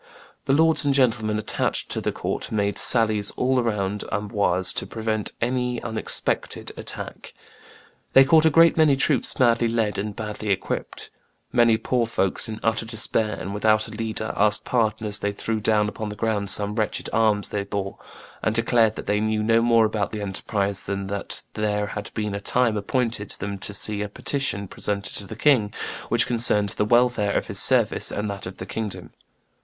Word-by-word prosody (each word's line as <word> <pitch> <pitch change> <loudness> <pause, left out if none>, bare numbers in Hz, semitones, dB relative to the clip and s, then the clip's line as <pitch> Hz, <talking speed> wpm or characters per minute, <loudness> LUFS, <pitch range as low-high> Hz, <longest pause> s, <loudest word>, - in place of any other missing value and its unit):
The 135 - +1
lords 160 +2 +4
and 140 -1 +1
gentlemen 110 -5 +1
attached 110 - -2
to - - -1
the - - -1
court - - -4
made 100 -2 0
sallies 110 -3 +4
all 130 0 +1
around 105 -4 -2
Amboise 100 -3 +2
to - - -2
prevent 110 -2 0
any 125 0 -1
unexpected 110 -1 -2
attack. - - -8 0.8
"They 135 - +7
caught 160 +2 +4
a - - +5
great 165 +2 +5
many 155 -3 +4
troops 135 -1 +1
badly 120 -2 +2
led 115 -3 -1
and 105 0 -4
badly 105 -1 -6
equipped. 95 -1 -4 0.4
Many 115 -2 +4
poor 120 +1 -1
folks, 95 -2 -1
in 110 0 -6
utter 115 0 0
despair 110 -1 -2
and 100 - -6
without 110 +1 +2
a - - -11
leader, 110 0 -3
asked 105 +1 +2
pardon 110 -2 0
as 105 -1 0
they 100 - -2
threw 110 +2 -3
down 105 0 +1
upon 110 0 -5
the 105 - -7
ground 105 -2 -2
some 105 0 +2
wretched 110 -1 -2
arms 110 -2 +2
they 100 -1 -3
bore, 100 -1 -5 0.4
and 110 - -1
declared 115 -1 +3
that - - -7
they 105 0 0
knew 110 0 -1
no 115 +1 +3
more 115 -1 +4
about 105 -1 -2
the 105 - -5
enterprise 100 0 -2
than 100 0 -4
that 100 - +1
there 105 -1 -1
had 105 0 -6
been 105 -2 -3
a 100 - -4
time 120 +1 +1
appointed 110 0 -2
them 100 +1 -5
to 105 - -4
see 105 +1 +1
a 105 - -4
petition 105 -3 -2
presented 100 +2 -4
to 100 - 0
the - - -8
king 125 -9 +2 0.4
which - - +3
concerned 115 -4 +2
the 105 - 0
welfare 120 -3 +2
of - - -2
his - - +2
service - - +5
and 105 +1 -3
that 100 -2 -7
of 95 - -9
the - - -7
kingdom." 110 -3 -6
110 Hz, 185 wpm, -23 LUFS, 105-115 Hz, 0.8 s, They